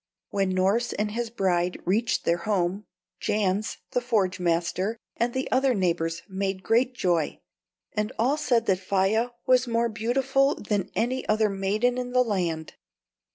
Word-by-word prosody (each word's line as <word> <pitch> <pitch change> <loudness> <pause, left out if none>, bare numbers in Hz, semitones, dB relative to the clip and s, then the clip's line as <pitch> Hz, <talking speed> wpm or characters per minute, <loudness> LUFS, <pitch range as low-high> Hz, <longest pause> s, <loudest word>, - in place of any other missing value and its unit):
When 195 -1 +1
Norss 200 +6 +2
and 210 0 -1
his 235 +1 -2
bride 180 -5 0
reached 220 +6 +1
their 170 - +3
home, 195 +1 0 0.3
Jans, 205 0 0
the 250 - +1
forge 215 -7 0
master, 180 +5 0 0.2
and 235 +1 0
the 260 +2 -2
other 260 -1 +3
neighbors 170 -3 0
made 195 -1 -3
great 250 +5 +2
joy, 175 -7 0 0.5
and 210 0 -1
all 250 +6 +2
said 250 -6 +1
that 185 -2 +2
Faia 195 +5 +1 0.2
was 255 0 +4
more 235 0 +1
beautiful 265 +6 +1
than 205 -2 -2
any 255 +3 0
other 215 0 +3
maiden 210 +6 0
in 250 0 -4
the 250 0 +5
land. 175 -8 -2
210 Hz, 155 wpm, -26 LUFS, 190-240 Hz, 0.5 s, the